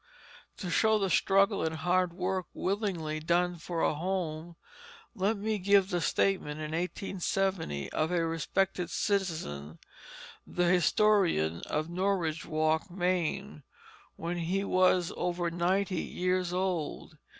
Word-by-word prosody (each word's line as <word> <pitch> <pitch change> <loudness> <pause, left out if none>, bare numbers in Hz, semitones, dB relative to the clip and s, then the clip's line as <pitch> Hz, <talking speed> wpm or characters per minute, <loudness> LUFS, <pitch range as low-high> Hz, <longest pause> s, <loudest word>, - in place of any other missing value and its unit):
To 180 -4 -4
show 220 +6 +4
the 195 -3 0
struggle 195 +1 +3
and 160 0 -1
hard 180 +2 +1
work 185 0 -2
willingly 180 -6 -2
done 175 +2 +1
for 165 0 -4
a - - +3
home, 170 -1 -3 0.6
let 205 0 0
me 215 +1 -1
give 195 0 +4
the 175 -1 0
statement 165 -7 +1
in 155 0 -4
1870 180 - -2
of 155 - 0
a 175 -2 +1
respected 175 +3 -1
citizen, 160 - -2 0.7
the 180 - 0
historian 175 - +3
of 155 +1 -1
Norridgewock, 165 -3 0
Maine, 180 0 -1 0.5
when 170 +2 -4
he 180 +4 -1
was 185 -2 +3
over 175 -1 -1
ninety 185 +3 0
years 180 0 -1
old. 180 -4 -3
180 Hz, 120 wpm, -30 LUFS, 165-195 Hz, 0.7 s, show